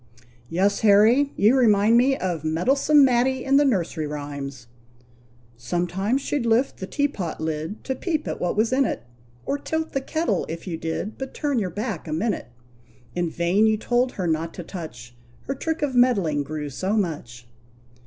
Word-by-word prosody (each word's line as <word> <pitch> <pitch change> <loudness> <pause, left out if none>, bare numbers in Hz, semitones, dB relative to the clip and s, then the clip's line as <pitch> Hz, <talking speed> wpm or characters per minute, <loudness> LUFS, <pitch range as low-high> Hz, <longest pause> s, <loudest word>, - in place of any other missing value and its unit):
"Yes, 195 +4 +1
Harry! 225 +7 +5
You 215 +6 +5
remind 220 -3 +4
me 265 +3 +4
of 175 -5 -3
Meddlesome 270 - +4
Matty 255 +1 +2
in 275 +1 +4
the 290 - +5
nursery 175 - 0
rhymes, 140 -3 -6 0.9
"Sometimes 180 - -1
she'd 290 -4 -1
lift 235 +3 +2
the 190 - -6
teapot 275 - -2
lid 160 +5 -4
To 265 - -2
peep 310 +3 -2
at - - -4
what 180 +3 -1
was 225 +3 +2
in 270 +1 +4
it, 170 - -2 0.4
Or 285 - -1
tilt 320 +2 -3
the 270 - 0
kettle, 270 - -1
if 165 +1 -6
you 175 -3 -3
did 165 +6 -4
But 265 0 -6
turn 285 -5 0
your 190 -4 -1
back 205 -2 -4
a 155 - -3
minute. 195 - -1 0.7
In 175 -1 -1
vain 175 +6 +2
you 220 0 +2
told 245 +3 0
her 185 - -3
not 165 0 -1
to 175 - -6
touch, 125 -10 -9 0.3
Her 275 - -3
trick 320 +3 -3
of 280 -3 0
meddling 200 - +3
grew 150 0 -5
so 185 +9 -2
much." 125 - -3
205 Hz, 175 wpm, -24 LUFS, 160-260 Hz, 0.9 s, Harry